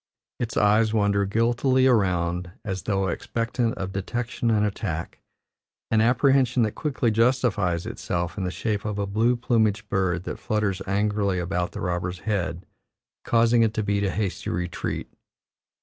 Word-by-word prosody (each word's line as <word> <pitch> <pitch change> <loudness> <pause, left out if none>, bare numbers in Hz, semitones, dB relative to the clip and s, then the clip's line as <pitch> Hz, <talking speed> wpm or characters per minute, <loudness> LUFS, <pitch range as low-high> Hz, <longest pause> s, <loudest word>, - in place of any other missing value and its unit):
Its 115 -2 -3
eyes 105 +2 +3
wander 100 -1 +2
guiltily 120 +5 +2
around, 90 -7 +1 0.2
as 95 -3 -3
though 95 +1 0
expectant 115 +5 -1
of 95 0 -4
detection 120 +5 -2
and 105 -2 +3
attack 95 -5 -4 0.7
an 110 -1 +4
apprehension 130 +1 +3
that 110 - 0
quickly 130 -5 -1
justifies 105 -7 +1
itself 85 -1 -3
in 100 - -3
the 90 - -1
shape 105 +2 -2
of 105 -1 -3
a 100 - 0
blue 110 +5 +2
plumaged 110 -3 +1
bird 95 -3 0
that - - -5
flutters 105 -3 -1
angrily 100 -1 +1
about 90 0 -2
the - - -6
robber's 90 0 -2
head, 90 -5 -2 0.6
causing 115 0 +3
it 110 -1 +2
to 110 - 0
beat 100 0 0
a 100 - +1
hasty 100 -1 -2
retreat. 90 0 -3
105 Hz, 150 wpm, -25 LUFS, 95-115 Hz, 0.7 s, an